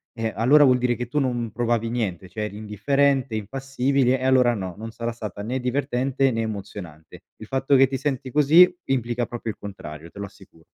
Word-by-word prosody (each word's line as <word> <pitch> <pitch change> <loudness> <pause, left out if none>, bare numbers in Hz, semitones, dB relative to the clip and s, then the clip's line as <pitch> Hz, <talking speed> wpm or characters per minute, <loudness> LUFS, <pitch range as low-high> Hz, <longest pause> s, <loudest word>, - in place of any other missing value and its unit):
eh, 115 -1 -2
allora 140 +7 +5
vuol 130 -3 +5
dire 125 0 +1
che 120 0 -5
tu 135 +5 -4
non 120 -4 0
provavi 115 0 0
niente, 95 -7 -3
cioè, 105 0 -5
eri 105 -1 -5
indifferente, 135 +5 +1
impassibile 130 +3 0
e 130 - -6
allora 130 -2 +4
no, 95 -5 -5
non 115 +2 -7
sarà 115 +1 -4
stata 105 -4 -7
né 125 +5 -3
divertente 135 +1 0
né 115 -2 -1
emozionante. 100 -7 -7
Il 110 - -11
fatto 135 +2 +1
che 135 0 +6
ti 135 - -3
senti 135 -2 -3
così, 155 +6 +6 0.2
implica 120 -2 0
proprio 115 -1 -6
il - - -5
contrario. 80 -5 -9
Te 100 - -12
lo 100 - -3
assicuro. 95 -4 -19
120 Hz, 200 wpm, -23 LUFS, 105-135 Hz, 0.2 s, che